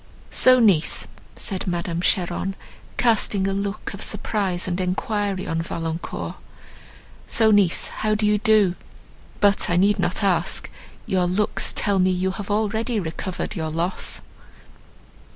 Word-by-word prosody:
"So, 255 0 +5
niece!" 195 -9 +3 0.3
said 190 -4 -4
Madame 175 -1 -2
Cheron, 180 +1 0 0.4
casting 210 -4 +3
a 195 - 0
look 200 +1 -3
of 195 - -8
surprise 190 -5 -1
and 180 0 -1
enquiry 195 +1 -1
on 165 0 -1
Valancourt, 165 0 -5 0.9
"so 220 -1 +3
niece, 200 -5 +3
how 215 0 -1
do 210 0 0
you 210 0 +3
do? 215 -4 +4 0.7
But 200 -1 +3
I 175 - +2
need 200 +3 +3
not - - 0
ask, - - 0 0.3
your 185 -2 +1
looks 195 +4 +1
tell 200 -2 +1
me 185 0 +4
you 185 +1 0
have 200 +1 -7
already 220 +2 0
recovered 180 +3 -4
your 160 -3 -2
loss." 170 +4 -1
195 Hz, 135 wpm, -23 LUFS, 175-210 Hz, 0.9 s, So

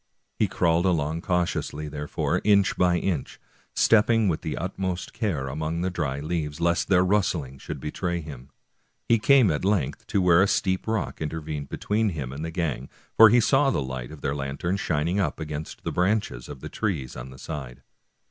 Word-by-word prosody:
He - - +3
crawled 85 +1 +2
along 80 -2 0
cautiously, 85 -4 -1
there 75 0 -5
fore, - - -1
inch 100 -2 +4
by 90 -1 +3
inch, 85 -4 -2 0.4
stepping 115 0 +4
with 80 -4 0
the 80 - -4
utmost 95 0 -3
care 95 - -2
among 80 +4 -3
the 95 +1 -1
dry 70 -6 -2
leaves, 75 -1 -3
lest 85 +1 +1
their 90 -1 +4
rustling 85 -9 0
should - - -6
betray 85 +3 -3
him. 70 -5 -9 0.6
He 115 - +4
came 125 -3 +5
at 75 - -2
length 95 -8 0
to - - +1
where 90 -1 +5
a 100 - +4
steep 95 0 0
rock 110 -8 -2
intervened 75 -2 -4
between 110 +1 0
him 70 -7 -5
and 75 +3 -6
the 80 - -3
gang, 80 -5 -3 0.3
for 110 0 +9
he 120 +3 +5
saw 135 +4 +3
the - - 0
light 65 -2 -5
of 80 -2 -11
their 70 -1 -1
lantern 70 +6 -2
shining 85 +1 0
up 95 - -1
against 75 -1 -6
the - - -2
branches 90 - 0
of 70 -3 -9
the - - -6
trees 80 - -3
on - - -7
the - - -11
other - - -14
side. 65 -6 -7
85 Hz, 195 wpm, -25 LUFS, 75-95 Hz, 0.6 s, for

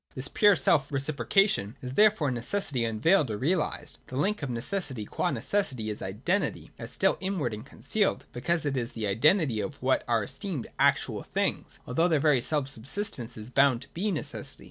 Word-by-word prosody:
157.] 130 +2 -2
This - - -10
pure 205 -2 +7
self 145 -1 +3
reciprocation 140 - +1
is 125 0 -5
therefore 205 -7 +4
Neces 130 +11 -2
sity 120 -4 0
unveiled 140 - +3
or 105 - -2
realised. 150 - -1
The 130 - -8
link 205 +7 0
of 145 - -3
necessity 125 - -3
qua - - -1
necessity 130 - -1
is 105 - -5
identity, 125 - -2
as - - -6
still - - +2
inward 185 - -2
and 105 +1 -6
concealed, 205 +9 -1
because 160 +6 -1
it 140 -2 0
is 120 -2 -3
the 110 -2 -3
identity 125 - +3
of 145 +1 -6
what 130 0 +2
are 115 -3 +2
esteemed 175 - -4
actual - - +2
things, - - -2
although 165 +8 +2
their 160 -4 +2
very 140 -4 +3
self 145 +1 0
subsistence 130 - -4
is 110 +3 -8
bound 135 -2 +3
to 140 - -16
be 200 +5 -2
necessity. 175 -7 -2
140 Hz, 190 wpm, -28 LUFS, 120-175 Hz, -, pure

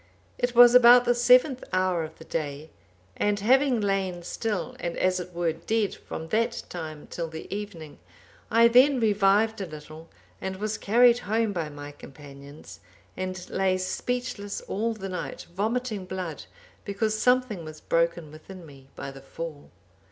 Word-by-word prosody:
It 245 0 -1
was 240 0 +9
about 245 0 +8
the 245 - +4
seventh 250 +2 +4
hour 185 -2 +1
of 160 0 -9
the 160 - -13
day, 150 -1 -5 0.4
and 205 0 0
having 255 +3 +3
lain 195 -4 -1
still 210 +2 -3
and 170 -1 -4
as 185 0 +1
it 180 0 -7
were 170 -2 -1
dead 205 +5 -1
from 160 0 -8
that 230 +4 0
time 155 -4 -7
till 170 -1 -5
the 160 0 -8
evening, 175 - -8 0.5
I 230 +1 +6
then 255 +3 +5
revived 210 0 +2
a 190 - -4
little, 155 +1 -11 0.3
and 190 - -4
was 215 +2 -3
carried 240 +3 +4
home 220 0 0
by 165 -4 -3
my 145 0 -9
companions, 140 0 -13 0.4
and 185 -1 -5
lay 190 -1 +1
speechless 215 +2 -3
all 225 +3 -2
the 195 -2 -6
night, 185 -1 -6
vomiting 215 0 -2
blood, 180 -5 -6 0.4
because 215 +2 -1
something 250 -5 +1
was 155 0 -9
broken 170 -2 0
within 175 +3 -12
me 135 -3 -15
by 140 - -6
the 135 0 -12
fall. 150 +1 -8
190 Hz, 160 wpm, -26 LUFS, 165-225 Hz, 0.5 s, was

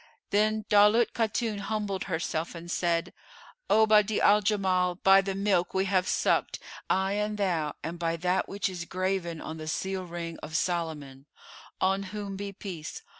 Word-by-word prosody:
Then 215 +1 +2
Daulat 210 +3 +5
Khatun 220 -1 -1
humbled 200 -2 -3
herself 165 -1 -3
and 170 +1 -7
said, 170 -2 0 0.6
"O 220 0 +5
Badi'a 215 -1 +4
al 210 +1 +5
Jamal, 190 -3 +1
by 195 +2 +5
the 195 0 -3
milk 195 -3 +1
we 190 0 +2
have 185 -2 +1
sucked, - - +1 0.3
I 190 +1 +1
and 210 +1 -1
thou, 170 -7 -1
and 165 +3 -5
by 165 -1 0
that 180 +2 0
which 200 +1 -1
is 180 -3 -5
graven 185 -2 -2
on 160 +1 -6
the 155 0 -7
seal 190 +4 -2
ring 170 -1 -6
of 155 +1 -7
Solomon 150 -7 -3 0.5
(on 195 +1 +2 0.2
whom 200 -2 -5
be 200 +1 -5
peace!) 180 -5 -7
190 Hz, 165 wpm, -28 LUFS, 170-205 Hz, 0.6 s, Daulat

